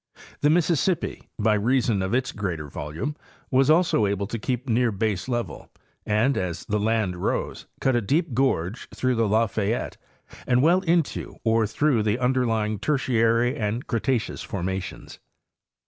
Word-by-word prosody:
The 145 - +3
Mississippi, 170 +1 +1
by 110 0 +2
reason 115 -1 +1
of 95 +5 0
its 130 0 0
greater 90 -7 -4
volume, 80 - -5 0.4
was 135 +2 +4
also 160 - +4
able 100 0 -1
to 115 +3 -5
keep 125 +3 -3
near 120 0 +2
baselevel, 110 +4 -2 0.4
and 110 +6 +2
as 90 -2 -4
the 105 0 0
land 105 -4 0
rose - - -2
cut 130 -2 +2
a 120 - +2
deep 145 - 0
gorge 110 -6 0
through 130 0 0
the 115 -2 +1
Lafayette 110 +1 0 0.5
and 125 +1 +3
well 175 +4 +5
into 170 -4 0
or 110 -1 +2
through 125 +2 +1
the 105 +1 +1
under 125 0 +1
lying 110 -2 -1
Tertiary 120 -3 +2
and 110 +3 -2
Cretaceous 120 0 -1
formations. 95 -1 -5
115 Hz, 145 wpm, -25 LUFS, 105-130 Hz, 0.5 s, well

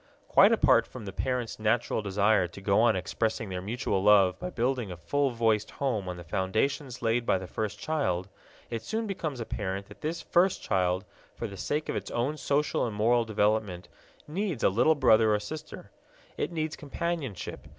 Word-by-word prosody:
Quite - - +6
apart - - +4
from 110 - -9
the 95 - -6
parents' 125 +2 -2
natural 110 +1 +1
desire 100 -1 +2
to 85 - -12
go 100 +2 +2
on 120 - +4
expressing 110 +4 -2
their 90 -1 -4
mutual 105 -1 -1
love 100 -2 +5
by 180 - -4
building 125 - -1
a 90 - -7
full 140 +12 0
voiced 115 -3 +1
home 110 -9 -2
on 90 - -5
the 85 - -8
foundations 120 - -1
laid 115 +1 +2
by 95 - +2
the 95 - -6
first 110 +3 -4
child, 105 - -1 0.4
it 115 -1 -3
soon 220 - -3
becomes 160 - -4
apparent 100 -4 -3
that 105 - -14
this 160 +2 -2
first 180 +2 +3
child, 95 0 0 0.3
for - - -5
the 100 -3 -6
sake 150 +10 -2
of - - -2
its - - -4
own 125 +6 -1
social 145 -1 0
and 110 - -5
moral 115 +3 +3
development, 105 -4 0 0.4
needs 175 - -2
a - - +6
little 120 +11 +3
brother 110 -6 +5
or - - 0
sister. 150 +9 -8 0.4
It - - -2
needs 155 -2 -2
companionship. 150 - -4
110 Hz, 185 wpm, -28 LUFS, 100-140 Hz, 0.4 s, Quite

